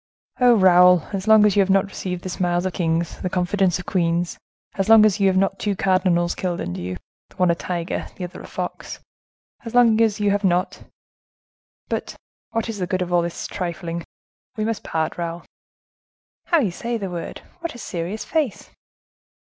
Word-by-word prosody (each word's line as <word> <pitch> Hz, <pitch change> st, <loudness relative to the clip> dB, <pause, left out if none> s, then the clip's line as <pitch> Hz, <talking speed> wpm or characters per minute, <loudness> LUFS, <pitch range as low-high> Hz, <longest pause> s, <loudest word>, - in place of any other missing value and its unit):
Oh, 245 Hz, -2 st, +6 dB
Raoul, 180 Hz, -3 st, +6 dB
as 195 Hz, +1 st, -3 dB
long 220 Hz, -1 st, +7 dB
as 205 Hz, -, +3 dB
you -, -, +3 dB
have 195 Hz, -1 st, +3 dB
not 195 Hz, +1 st, +4 dB
received 180 Hz, -2 st, -5 dB
the 185 Hz, -, -4 dB
smiles 175 Hz, 0 st, -1 dB
of 185 Hz, -, -2 dB
kings, 165 Hz, -1 st, -1 dB
the 185 Hz, -, -2 dB
confidence 180 Hz, 0 st, +1 dB
of 180 Hz, -, -9 dB
queens; 170 Hz, -1 st, 0 dB, 0.4 s
as 195 Hz, +1 st, -2 dB
long 220 Hz, -1 st, +8 dB
as 210 Hz, -1 st, +2 dB
you 195 Hz, -, +4 dB
have 190 Hz, -1 st, +2 dB
not 195 Hz, 0 st, +3 dB
had -, -, -29 dB
two 205 Hz, -2 st, -1 dB
cardinals 185 Hz, -2 st, +2 dB
killed 180 Hz, -2 st, -3 dB
under 90 Hz, +1 st, -4 dB
you, 90 Hz, +1 st, -4 dB, 0.3 s
the -, -, -22 dB
one 180 Hz, -2 st, +3 dB
a -, -, +3 dB
tiger, 170 Hz, 0 st, -4 dB
the 185 Hz, -, -7 dB
other 180 Hz, -, -7 dB
a -, -, -10 dB
fox; -, -, -5 dB, 0.7 s
as 230 Hz, -1 st, -7 dB
long 230 Hz, -2 st, +5 dB
as 220 Hz, -2 st, +2 dB
you 205 Hz, -1 st, +2 dB
have 205 Hz, +1 st, 0 dB
not—But 180 Hz, -1 st, -5 dB, 0.3 s
what 225 Hz, 0 st, -2 dB
is 225 Hz, -3 st, -5 dB
the 180 Hz, -, -2 dB
good 185 Hz, -1 st, 0 dB
of 175 Hz, 0 st, -5 dB
all 175 Hz, -, +4 dB
this 170 Hz, 0 st, -4 dB
trifling? 170 Hz, -2 st, -4 dB, 0.5 s
We 215 Hz, -, -1 dB
must 225 Hz, -1 st, -2 dB
part, 160 Hz, +1 st, -2 dB
Raoul." 170 Hz, 0 st, -4 dB, 1.0 s
"How 335 Hz, -3 st, +3 dB
you 205 Hz, -8 st, 0 dB
say 235 Hz, +6 st, -3 dB
the 195 Hz, -4 st, -5 dB
word! 170 Hz, -1 st, -6 dB, 0.2 s
What 335 Hz, -5 st, -5 dB
a -, -, -8 dB
serious 185 Hz, -1 st, -5 dB
face!" 300 Hz, -10 st, -2 dB
185 Hz, 195 wpm, -22 LUFS, 175-210 Hz, 1.0 s, long